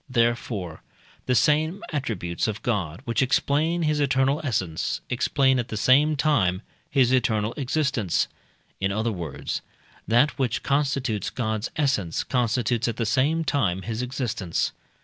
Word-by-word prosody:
Therefore 115 -8 -1 0.5
the 125 - +2
same 155 - +2
attributes 105 - -2
of 110 -1 -4
God 95 -8 -1
which 115 +2 0
explain 155 +6 +1
his 150 -1 +1
eternal 135 +1 +2
essence, 95 - -1
explain 135 0 +2
at 120 - -2
the 110 - -4
same 145 +7 +4
time 110 - +1 0.3
his 130 -3 +3
eternal 110 -4 +1
existence 135 - 0 0.5
in 95 +1 0
other 110 +3 0
words, 85 -8 -4 0.5
that 120 +8 +3
which 125 -4 0
constitutes 135 -6 0
God's 110 -2 -2
essence 130 - 0
constitutes 120 -1 0
at 115 - -2
the 115 - 0
same 140 +9 +2
time 95 - 0
his 115 +1 -3
existence. 125 -9 -2
125 Hz, 135 wpm, -25 LUFS, 105-140 Hz, 0.5 s, same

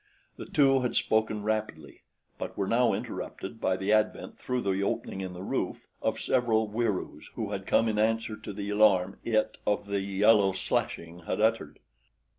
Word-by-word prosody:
The - - -8
two 135 -2 +4
had 125 -1 -2
spoken 110 -1 +1
rapidly 105 -9 -3 0.4
but - - -5
were 100 - 0
now 115 +3 +3
interrupted 105 +4 -5
by 95 0 +1
the 95 +3 +1
advent 110 0 0
through 125 0 -2
the 100 -2 0
opening 95 -1 -2
in 95 -1 -5
the 90 +1 -8
roof - - -3 0.2
of - - -1
several 115 -4 +1
Wieroos 105 -8 -2
who 110 -3 -3
had 95 -1 -5
come 115 - +3
in 105 -1 0
answer 110 0 +1
to 110 -1 -8
the 100 0 -4
alarm 100 -3 +3
it 110 -2 0
of 105 0 +1
the 100 -1 -1
yellow 100 0 +4
slashing 85 -2 -3
had - - -1
uttered. 110 -9 +1
105 Hz, 175 wpm, -28 LUFS, 95-110 Hz, 0.4 s, two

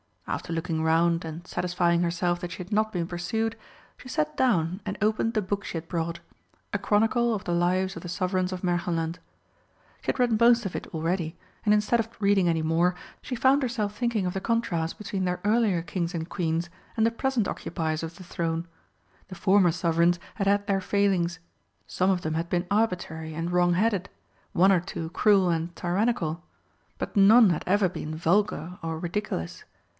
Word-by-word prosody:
After - - -4
looking 165 -1 -2
round 165 +1 +2
and 165 +2 -7
satisfying 175 -1 +1
herself 175 0 0
that 175 0 -5
she - - -9
had 180 - -16
not 215 +1 +2
been 175 -2 -1
pursued, 220 +6 -2 0.4
she - - -13
sat 150 -9 -1
down 185 -7 +1
and 200 0 -3
opened 215 +2 +1
the 215 - +1
book 200 +1 -3
she - - -6
had 165 0 -7
brought 165 -1 -2 0.5
a 205 - +1
chronicle 225 +3 +2
of 200 - -5
the 175 - -3
lives 185 +2 +1
of 165 - -7
the 175 - -7
Sovereigns 185 +1 -1
of 180 - -5
Märchenland. 175 -2 -1 0.8
She - - -19
had - - +1
read 240 -3 +3
most 235 -1 +5
of 195 - -4
it - - -4
already, 165 0 -2 0.3
and 210 - +5
instead 210 +3 +2
of 225 - 0
reading 200 -3 +3
any 165 -1 +1
more, 170 +3 +2 0.3
she 260 - -4
found 265 +4 +4
herself 225 -5 -2
thinking 235 -4 0
of 180 - -1
the 195 - -2
contrast 195 -9 -1
between 195 -2 -3
their 180 0 -2
earlier 210 -5 +2
Kings 170 +1 -3
and 160 -1 -3
Queens 170 -1 -1 0.3
and 220 - +4
the 230 - +3
present 245 -2 0
occupiers 160 -2 -3
of 165 +1 -6
the 185 - -11
throne. 165 -1 -3 0.6
The 185 - -9
former 190 -1 +4
Sovereigns 170 +1 +2 0.2
had 195 -2 -1
had 200 0 +3
their 195 -1 +1
failings; 185 -4 +1 0.5
some 185 +1 0
of 185 -2 +1
them 155 -2 -2
had 165 +1 -2
been 175 0 0
arbitrary 175 -7 -1
and 165 +2 -3
wrong 175 0 +3
headed, 200 0 +1 0.4
one 190 +3 +5
or 185 - +4
two 165 -2 -5
cruel 195 -2 +4
and 165 +1 -1
tyrannical. 175 -3 0 0.6
But - - -4
none 210 +1 +7
had 165 - -1
ever 200 +1 +3
been 155 -2 -5
vulgar 180 0 0
or 165 -1 -3
ridiculous. 170 - -4
180 Hz, 190 wpm, -27 LUFS, 170-205 Hz, 0.8 s, none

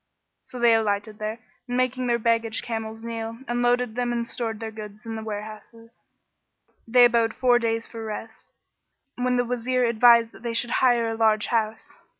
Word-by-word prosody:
So 255 - -11
they 235 -1 +5
alighted 210 -1 -1
there 215 +1 -3 0.3
and 245 0 -2
making 255 0 0
their 235 -1 +2
baggage 230 -1 0
camels 225 -1 -5
kneel, 230 -1 -5
unloaded 245 -1 +1
them 245 0 -1
and 235 -1 -2
stored 225 -3 -4
their 225 -1 -5
goods 215 0 -10
in 225 0 -5
the 220 - -5
warehouses.[FN#13] 220 +2 -12
They 245 +1 +6
abode 230 -1 +2
four 245 -2 +3
days 230 -1 -1
for 230 -1 -8
rest; 220 +1 -8 0.6
when 250 0 0
the 245 - +1
Wazir 250 +1 0
advised 235 0 +5
that - - -16
they 235 -1 -3
should 240 +1 +1
hire 240 -3 +3
a - - -3
large 220 -2 +2
house. 220 -1 -1
230 Hz, 175 wpm, -24 LUFS, 220-240 Hz, 0.6 s, They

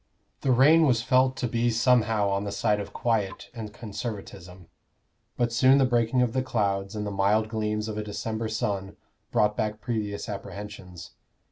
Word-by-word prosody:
The 135 - +1
rain 150 +6 +6
was 115 -3 +2
felt 130 +1 +3
to 125 - -1
be 120 +1 +1
somehow 115 -3 +2
on 100 0 0
the 100 - -4
side 105 +1 +1
of 100 - -6
quiet 110 -5 -2
and 110 -3 -7
Conservatism; 100 -5 -7 0.7
but 120 -1 0
soon 130 +3 +5
the 135 - +4
breaking 120 0 +2
of 120 -2 -1
the 130 - +1
clouds 100 -4 -1
and 105 0 -3
the 105 - -3
mild 105 +3 +2
gleams 105 -1 -2
of 110 -1 -4
a - - -3
December 110 +2 -4
sun 100 -3 -3 0.3
brought 105 -3 +2
back 105 0 -2
previous 105 -3 -3
apprehensions. 100 -3 -8
110 Hz, 170 wpm, -26 LUFS, 100-120 Hz, 0.7 s, rain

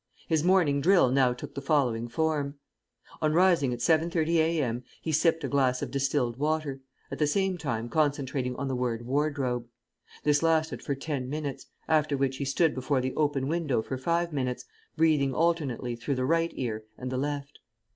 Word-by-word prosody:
His 160 -2 +1
morning 170 -6 +3
drill 175 -6 +5
now 130 -1 +4
took 125 - -7
the 140 - -5
following 130 -6 +1
form: 145 +2 -1 0.7
On 155 0 +2
rising 175 -7 +4
at 120 - -2
7.30 165 +2 +2
a.m. 150 -7 +1 0.2
he 160 - -3
sipped 160 +1 +2
a - - 0
glass 130 -1 +1
of 130 - -5
distilled 135 -3 0
water, 150 -1 -1 0.3
at - - -5
the 150 - +3
same 190 +4 +1
time 120 -9 -3
concentrating 135 -3 0
on 140 - -3
the 130 - -1
word 120 -2 -2
"wardrobe." 135 -3 -1 0.6
This 145 -1 +3
lasted 160 -1 +1
for 140 - -2
ten 135 -2 -4
minutes, 145 -1 -4 0.2
after 155 -2 +2
which 135 -1 0
he 140 - -3
stood 150 +4 +2
before 130 +1 0
the 130 0 -2
open 145 -3 0
window 150 -8 0
for 130 - -4
five 170 +5 -1
minutes, 125 -3 -2 0.3
breathing 150 -5 +3
alternately 145 -7 0
through 125 +4 -2
the 130 0 -1
right 165 +3 +2
ear 110 -4 -3
and 130 0 -5
the 130 - -1
left. 145 0 -4
140 Hz, 180 wpm, -28 LUFS, 130-160 Hz, 0.7 s, drill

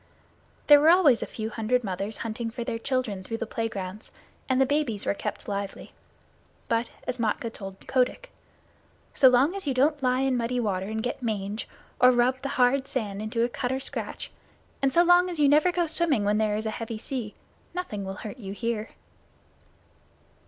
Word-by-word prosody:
There 290 -1 +8
were 310 - +6
always 330 -9 +5
a - - -3
few 220 0 -5
hundred 240 +2 0
mothers 195 +2 -3
hunting 225 +1 -3
for 235 +1 -5
their 235 -1 -3
children 240 -7 -2
through 225 +4 -4
the 230 - -3
playgrounds, 210 -3 -5 0.4
and 260 0 +2
the 265 - +5
babies 265 -7 -1
were - - +1
kept - - -5
lively. 200 -1 -5 0.7
But, 230 +1 0 0.2
as 250 0 -3
Matkah 225 +1 -1
told 195 -1 -7
Kotick, 260 - 0 0.8
"So 260 - +7
long 255 +7 +4
as 390 -6 -4
you 270 - 0
don't 290 +3 +2
lie 255 0 +2
in 270 -1 +1
muddy 245 +1 -1
water 195 -4 -1
and 220 +1 -3
get 245 +2 -3
mange, 210 -2 -3 0.3
or 250 0 +7
rub 250 +1 +2
the 275 - -3
hard 260 +2 +3
sand 210 -7 -3
into 225 +2 -1
a - - +3
cut 245 +1 -3
or 260 - -1
scratch, - - -5 0.5
and 270 -1 +2
so 340 +5 +5
long 355 +1 +5
as 340 -3 -4
you 290 - +5
never 300 +5 +5
go 350 -1 +1
swimming 320 -8 +2
when 205 +1 +2
there 210 -1 +1
is 220 - -4
a 220 - -1
heavy 230 0 -5
sea, 230 -2 -5 0.4
nothing 215 - -4
will 190 0 -5
hurt 210 - -6
you 195 -5 -7
here." 225 0 -3
240 Hz, 195 wpm, -26 LUFS, 215-270 Hz, 0.8 s, There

